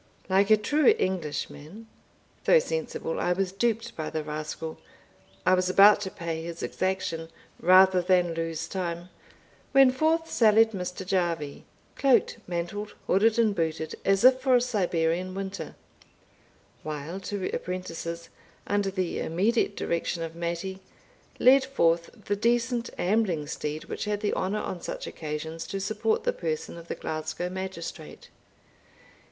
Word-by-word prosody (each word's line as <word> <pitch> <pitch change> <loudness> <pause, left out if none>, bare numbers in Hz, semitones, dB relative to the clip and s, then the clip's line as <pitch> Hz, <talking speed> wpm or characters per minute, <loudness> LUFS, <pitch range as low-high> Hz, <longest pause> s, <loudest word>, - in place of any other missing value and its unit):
Like 195 +2 +3
a 215 - +7
true 300 - +3
Englishman, 180 +2 -4 0.6
though - - +7
sensible 485 0 -2
I 180 - +2
was 190 0 -1
duped 230 +3 -1
by 155 -1 -4
the 155 - -3
rascal, 155 +1 -5 0.7
I 185 - +5
was 185 0 +2
about 200 +2 +7
to 195 - -3
pay 165 -3 -4
his 170 0 -6
exaction 165 -4 -2 0.3
rather 185 +1 +6
than 180 -1 +2
lose 165 -1 -3
time, 175 -2 -4 0.6
when 270 -1 +7
forth 320 +5 +1
sallied 220 -3 +4
Mr. 180 -1 -5
Jarvie, 170 -6 -1 0.3
cloaked, 265 -3 +3
mantled, 180 +4 -4
hooded, 215 +4 +3
and 225 -3 +3
booted, 160 -3 -2
as 195 +2 +2
if 255 +1 +7
for 260 -1 +4
a - - +6
Siberian 180 -6 0
winter, 195 0 -5 1.1
while 155 +4 -5
two 195 -1 -3
apprentices, 170 -2 -5 0.4
under 205 -1 0
the 185 -2 -2
immediate 205 +5 +1
direction 170 0 -2
of 165 0 -6
Mattie, 170 +3 -4 0.6
led 265 +1 +6
forth 170 -11 +1 0.2
the 205 - 0
decent 235 +2 +1
ambling 185 -5 +1
steed 150 +1 -4
which - - -4
had 210 0 -2
the 210 - 0
honour 200 +3 -1
on 180 - -5
such - - -5
occasions 160 +1 -5
to 195 - -3
support 215 +3 0
the - - +1
person 160 -2 -4
of 170 0 -11
the - - -4
Glasgow 155 +3 -4
magistrate. 185 -4 -7
185 Hz, 140 wpm, -27 LUFS, 165-210 Hz, 1.1 s, a